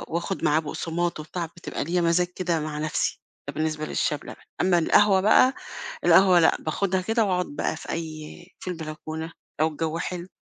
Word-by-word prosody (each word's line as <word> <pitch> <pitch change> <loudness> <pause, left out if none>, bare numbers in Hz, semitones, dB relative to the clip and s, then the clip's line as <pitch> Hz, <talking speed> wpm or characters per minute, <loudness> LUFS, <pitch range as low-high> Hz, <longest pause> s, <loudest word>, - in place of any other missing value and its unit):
وآخد 170 +1 -2
معاه 155 0 +4
بُقصمات 165 +2 -2
وبتاع، 165 +3 -4
بتبقى 170 +2 -6
ليّا 175 +4 0
مزاج 170 +1 +3
كده 175 -2 -1
مع 150 -1 -4
نفسي، 155 0 -1 0.3
ده 140 - -4
بالنسبة 155 0 -2
للشاي 150 -1 0
بلبن، - - -10 0.3
أمّا 180 -1 +4
القهوة 195 +3 +4
بقى، 235 +6 +5 0.5
القهوة 185 -2 +7
لأ، 165 - +4
باخدها 185 +4 -1
كده 225 +4 +1
وأقعد 180 -2 +1
بقى 145 +2 -2
في - - -10
أي 160 +1 -6
في - - -6
البلكونة 160 -1 -6 0.3
لو 155 - +4
الجَو 160 +1 -3
حلو، 175 +1 -4
170 Hz, 175 wpm, -25 LUFS, 155-180 Hz, 0.5 s, القهوة